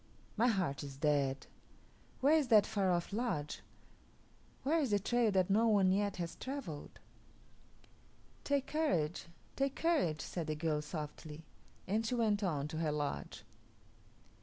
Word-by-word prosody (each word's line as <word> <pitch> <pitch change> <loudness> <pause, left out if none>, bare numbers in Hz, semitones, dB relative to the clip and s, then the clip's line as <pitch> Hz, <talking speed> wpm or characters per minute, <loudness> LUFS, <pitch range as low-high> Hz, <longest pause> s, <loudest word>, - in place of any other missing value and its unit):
My 230 +3 +3
heart 185 - 0
is 140 -1 -8
dead. 140 -2 +1 0.8
Where 285 +4 +5
is 305 -4 +2
that 215 -4 +6
far 195 -3 0
off 175 +2 0
lodge? 205 -11 -2 1.0
Where 315 +5 +2
is 280 -5 0
the 205 - +3
trail 235 +3 +2
that 185 0 +2
no 225 +3 +4
one 200 -4 +4
yet 200 +1 +1
has 170 -2 -3
travelled?" 260 - -6 1.4
"Take 280 -1 +1
courage, 175 - 0 0.3
take 275 0 0
courage," 290 - +1
said 170 -3 -4
the 155 - -1
girl 150 -1 0
softly, 150 0 -7 0.4
and 215 +4 0
she 225 +2 -1
went 220 -3 +2
on 150 -7 -1
to 160 - -5
her 160 -2 0
lodge. 145 -1 -3
190 Hz, 145 wpm, -35 LUFS, 155-235 Hz, 1.4 s, that